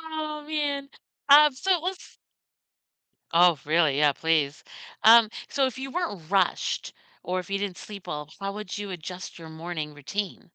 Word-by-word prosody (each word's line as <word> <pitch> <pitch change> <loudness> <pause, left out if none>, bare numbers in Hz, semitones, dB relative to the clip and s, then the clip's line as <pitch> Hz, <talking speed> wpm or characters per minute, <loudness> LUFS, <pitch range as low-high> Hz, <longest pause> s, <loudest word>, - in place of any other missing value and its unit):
Oh, 310 -2 -5
man. 285 -2 -1 0.4
Um, 295 +1 +8
so 375 +9 -3
it 355 - +2
was 370 +2 -2 1.4
Oh, 170 -1 +5
really? 155 -2 +2
Yeah, 150 -1 +4
please. 155 -2 0 0.4
Um, 225 0 +8 0.2
so 275 -1 +1
if 260 0 -5
you 270 0 -5
weren't 205 - -4
rushed 195 -3 0 0.3
or 185 +1 -1
if 180 - -12
you 200 - 0
didn't 195 -3 -3
sleep 200 -3 -10
well, 150 0 -5
how 195 0 -3
would 210 -1 -6
you 205 -1 -5
adjust 180 +2 -7
your 165 -1 -10
morning 160 -2 -6
routine? 185 +7 -5
195 Hz, 165 wpm, -26 LUFS, -, 1.4 s, Um